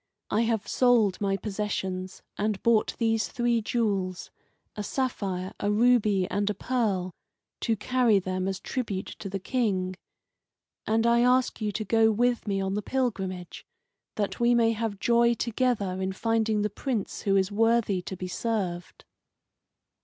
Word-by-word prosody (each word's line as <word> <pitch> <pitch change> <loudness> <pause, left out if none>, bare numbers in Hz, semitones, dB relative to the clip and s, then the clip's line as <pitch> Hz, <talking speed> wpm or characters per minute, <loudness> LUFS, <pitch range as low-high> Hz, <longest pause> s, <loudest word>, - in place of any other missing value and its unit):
I 215 - +2
have 225 -2 0
sold 235 -7 +3
my 195 -1 +1
possessions, 190 -2 -4
and 210 -1 -2
bought 230 -2 +3
these 225 -1 +1
three 240 -1 0
jewels 200 -5 -1 0.4
a 210 - -4
sapphire, 195 -6 -2
a 205 - 0
ruby, 215 -4 +3
and 205 0 0
a 210 - -1
pearl 200 -7 -1 0.5
to 230 - 0
carry 240 0 +2
them 185 0 -2
as 190 -1 -2
tribute 210 -7 -3
to 200 - -6
the 195 - -3
King. 190 -4 -1 0.9
And 225 +1 +2
I 235 0 +4
ask 250 -1 +2
you 210 -1 0
to 215 - -3
go 225 +1 +4
with 240 +1 +1
me 195 -1 0
on 190 0 -1
the 210 - -1
pilgrimage, 190 -8 -3 0.5
that 205 -2 -2
we 240 0 +4
may 230 -1 +4
have 220 -3 -3
joy 235 +1 +3
together 220 -5 -1
in 190 0 -1
finding 220 0 +1
the 210 - -1
Prince 235 -2 -3
who 195 -1 +1
is 190 +1 +2
worthy 225 -3 +2
to 185 +1 -7
be 185 - -5
served." 180 -3 -3
210 Hz, 155 wpm, -27 LUFS, 190-235 Hz, 0.9 s, I